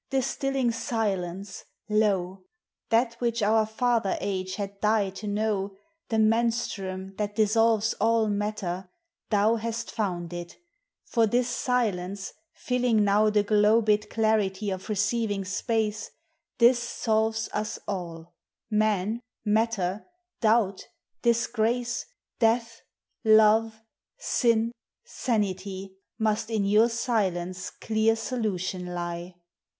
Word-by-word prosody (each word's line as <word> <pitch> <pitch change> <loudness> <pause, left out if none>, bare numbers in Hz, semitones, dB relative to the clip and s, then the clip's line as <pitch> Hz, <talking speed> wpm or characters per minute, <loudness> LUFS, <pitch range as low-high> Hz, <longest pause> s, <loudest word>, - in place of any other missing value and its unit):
Distilling 270 -1 0
silence, 200 -5 -3 0.2
lo! 195 -3 0 0.4
That 230 +1 +3
which 235 -2 0
our 215 +1 +3
father 225 -2 +1
age 185 -1 -3
had 200 -1 -5
died 210 -3 +2
to 210 - -6
know, 205 -2 -1 0.3
The 225 - 0
menstruum 215 -4 0
thai 210 - 0
dissolves 220 +1 +2
all 225 0 +3
matter 200 -3 -3 0.4
thou 215 +2 +3
Hast 230 +1 -4
found 175 -5 -3
it; 175 0 -7 0.5
for 230 -2 +2
this 240 +3 +1
silence, 200 -7 -1 0.3
Ailing 245 -4 +2
m»\\ 210 +2 +4
The 210 -1 +2
globed 210 0 +3
clarity 210 -3 +1
of 190 +2 -6
receiving 215 -1 0
space, 215 +1 -1 0.5
This 240 0 +6
solves 220 -2 0
us 210 0 -2
all: 170 -4 -5 0.4
man, 215 +1 +1 0.2
matter, 210 -3 0 0.3
doubt, 215 -4 +2 0.3
disgrace, 235 0 0 0.3
Death, 230 0 +1 0.4
love, 220 0 +5 0.4
sin, 230 -2 +1 0.3
sanity. 195 - -2 0.2
Must 215 -1 0
in 215 -3 0
your 215 +4 +4
silence 185 -6 -1
1 - - -31
clear 220 0 +2
solution 195 -6 -3
lie. 175 +1 -5
215 Hz, 105 wpm, -27 LUFS, 195-230 Hz, 0.5 s, This